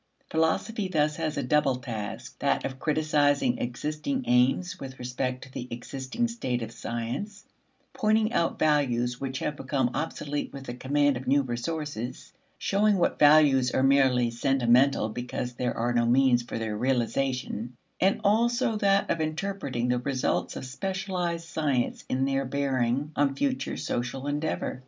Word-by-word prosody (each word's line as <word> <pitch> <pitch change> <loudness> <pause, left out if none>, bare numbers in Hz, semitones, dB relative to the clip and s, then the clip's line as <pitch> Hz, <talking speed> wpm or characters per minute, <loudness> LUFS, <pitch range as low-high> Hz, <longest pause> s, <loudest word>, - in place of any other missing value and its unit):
Philosophy 190 +6 0
thus 150 -4 +1
has 155 -2 -2
a 140 - 0
double 140 0 +2
task: 115 -5 -6
that - - +1
of 130 -1 -5
criticizing 145 -4 +2
existing 150 - -2
aims 135 +10 +2
with 135 -1 -8
respect 125 +1 -3
to 130 - -13
the 125 - -6
existing 130 - -3
state 130 - -2
of 115 - -6
science, 120 - -5 0.5
pointing 215 +1 +2
out 170 - +1
values 125 -5 +1
which 135 -1 -3
have 150 +2 -2
become 130 -3 -1
obsolete 145 -2 -3
with 140 -1 -8
the 120 - -6
command 140 +2 +1
of 130 - -8
new 140 +2 +4
resources, 125 0 -4 0.2
showing 205 +1 +2
what 175 - +1
values 145 -4 +6
are 130 - +1
merely 130 -3 +4
sentimental 125 0 +3
because 120 +2 -4
there 125 0 -2
are 120 +1 0
no 120 -1 +2
means 125 0 +4
for 120 - -6
their 110 -2 -3
realization; 125 -1 -1 0.2
and 190 +1 +3
also 235 +3 +2
that 200 -1 +3
of 165 - 0
interpreting 155 -6 -2
the 125 0 +2
results 130 +1 -1
of - - -5
specialized 180 +2 -3
science 145 -7 -1
in 130 +1 +1
their 135 0 0
bearing 135 0 0
on 140 -1 +2
future 265 - -1
social 125 +3 -3
endeavor. 145 -2 -2
135 Hz, 150 wpm, -27 LUFS, 125-160 Hz, 0.5 s, values